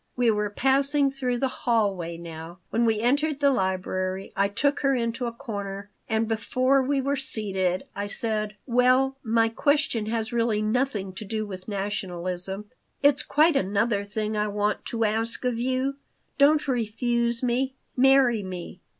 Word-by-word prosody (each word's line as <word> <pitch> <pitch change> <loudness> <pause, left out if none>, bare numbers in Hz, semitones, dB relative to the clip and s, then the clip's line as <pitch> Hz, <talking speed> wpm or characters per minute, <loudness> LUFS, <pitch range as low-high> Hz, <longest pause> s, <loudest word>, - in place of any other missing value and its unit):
We 245 -2 +3
were 210 -1 0
passing 275 +5 +3
through 255 -2 -2
the 265 - +1
hallway 200 -10 -1
now. 165 0 -9
When 235 +1 +2
we 220 -2 +1
entered 285 +4 +1
the 280 -1 +4
library 185 -3 -2
I 200 0 +3
took 285 +8 0
her 275 -1 +2
into 235 0 -1
a - - -3
corner, 200 -3 -6 0.2
and 220 0 +1
before 255 +4 +2
we 275 +1 0
were 275 +2 0
seated 190 -8 -1
I 200 0 -3
said: 215 0 -2
"Well, 255 +2 +3
my 225 -1 +2
question 265 -2 +1
has 225 +1 -2
really 230 -2 +1
nothing 215 -3 -1
to 190 - -7
do 215 +1 -3
with 185 -2 -8
nationalism. 190 -1 -3 0.4
It's 285 0 +5
quite 310 +1 +3
another 200 0 +1
thing 215 +1 -3
I 210 0 0
want 210 0 -1
to 230 -1 -1
ask 225 +4 -1
of 245 -2 0
you. 260 +2 -1 0.4
Don't 295 +2 +4
refuse 235 0 0
me. 260 +2 0 0.2
Marry 260 -3 +5
me. 185 -1 -7
225 Hz, 160 wpm, -26 LUFS, 200-260 Hz, 0.4 s, It's